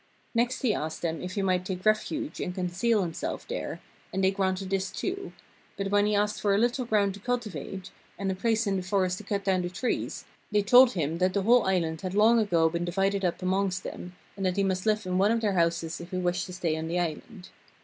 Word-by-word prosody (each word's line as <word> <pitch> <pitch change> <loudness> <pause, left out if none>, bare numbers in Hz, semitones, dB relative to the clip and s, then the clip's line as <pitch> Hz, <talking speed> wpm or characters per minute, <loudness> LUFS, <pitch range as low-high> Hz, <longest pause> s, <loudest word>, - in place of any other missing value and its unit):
Next 245 +3 0
he 235 -5 +3
asked 160 +2 -4
them 165 -1 -2
if 180 +1 -5
he 200 - 0
might 185 -1 +1
take 185 0 -5
refuge 295 +8 0
and 180 - -3
conceal 190 +4 +1
himself 165 -2 -4
there, - - -4 0.3
and 190 +1 -1
they 190 - +4
granted 190 -1 -1
this 195 -1 0
too; 380 +1 -4 0.5
but 195 0 -2
when 205 0 +4
he 210 - +1
asked 210 +1 0
for 200 -1 +3
a - - +3
little 240 +3 +1
ground 205 -4 +2
to 200 - -10
cultivate, 195 - -4 0.3
and 195 -1 -1
a - - 0
place 225 +4 +1
in 195 -1 0
the - - -1
forest 185 -1 0
to - - -9
cut 200 -1 -2
down 190 -2 +2
the 175 - -3
trees, 240 +8 -3 0.3
they 205 -1 +3
told 245 +4 +7
him 165 -1 -1
that 185 +1 +1
the 200 - +1
whole 235 0 +5
island 165 -4 0
had 185 0 -4
long 225 +3 +5
ago 170 -7 +3
been 170 +1 -2
divided 195 +3 0
up 180 0 -1
amongst 185 0 0
them, 180 0 -7 0.2
and 195 - -5
that 185 0 0
he 200 - +3
must 190 +1 -1
live 215 -1 +2
in 185 0 0
one 200 +2 +4
of 230 0 +1
their 210 -3 +1
houses 170 -1 0
if 170 - -9
he 185 - -3
wished 180 0 -1
to 180 - -8
stay 170 -3 -1
on 160 0 -4
the 175 +2 -1
island. 175 +4 -5
190 Hz, 240 wpm, -28 LUFS, 180-210 Hz, 0.5 s, told